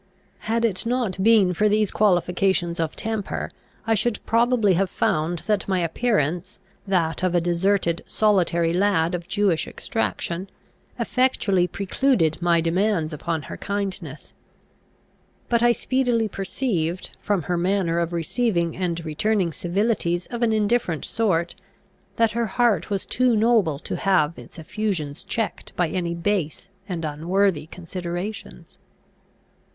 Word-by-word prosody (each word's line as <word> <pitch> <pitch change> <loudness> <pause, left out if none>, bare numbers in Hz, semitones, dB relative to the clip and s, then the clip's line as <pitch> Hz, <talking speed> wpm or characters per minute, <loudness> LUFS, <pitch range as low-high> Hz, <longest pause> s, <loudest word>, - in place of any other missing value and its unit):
Had 230 +1 +2
it 200 -5 0
not 230 -6 -1
been 205 -4 +5
for 210 +5 +2
these 210 -1 +2
qualifications 180 -3 +1
of 160 -2 -1
temper, 220 -2 -3 0.3
I 225 - +2
should 220 +1 +1
probably 230 -3 +3
have 190 +2 +1
found 160 +2 0
that 210 -3 0
my 190 -1 +1
appearance, 175 - -1 0.3
that 170 -4 0
of 185 -1 +1
a - - +5
deserted, 175 0 +1
solitary 175 -5 +2
lad, 180 -3 +2
of 175 -1 -4
Jewish 195 -6 +1
extraction, 190 -4 -3 0.5
effectually 205 -8 +1
precluded 195 - +1
my 170 -1 +3
demands 170 -1 0
upon 160 +1 -3
her - - -8
kindness. 190 -8 -4 1.2
But 235 -1 +2
I 240 0 +5
speedily 245 -2 +1
perceived, 190 -4 -2
from 200 -5 0
her 180 - -1
manner 175 -1 +1
of 170 0 -1
receiving 170 0 0
and 170 -2 -2
returning 180 +2 0
civilities 175 0 0
of 240 0 -4
an 235 -2 +3
indifferent 215 -6 +1
sort, 180 -7 0 0.6
that 230 -1 +3
her 235 0 -1
heart 235 +1 +1
was 200 -2 -2
too 250 -1 +2
noble 215 -9 +3
to 145 - -5
have 170 -5 +1
its - - -13
effusions 165 -4 -3
checked 225 -1 -4
by 175 -2 +1
any 170 -1 -2
base 180 -1 -2 0.2
and 170 -3 -3
unworthy 165 +2 0
considerations. 175 +4 -6
185 Hz, 135 wpm, -23 LUFS, 170-215 Hz, 1.2 s, been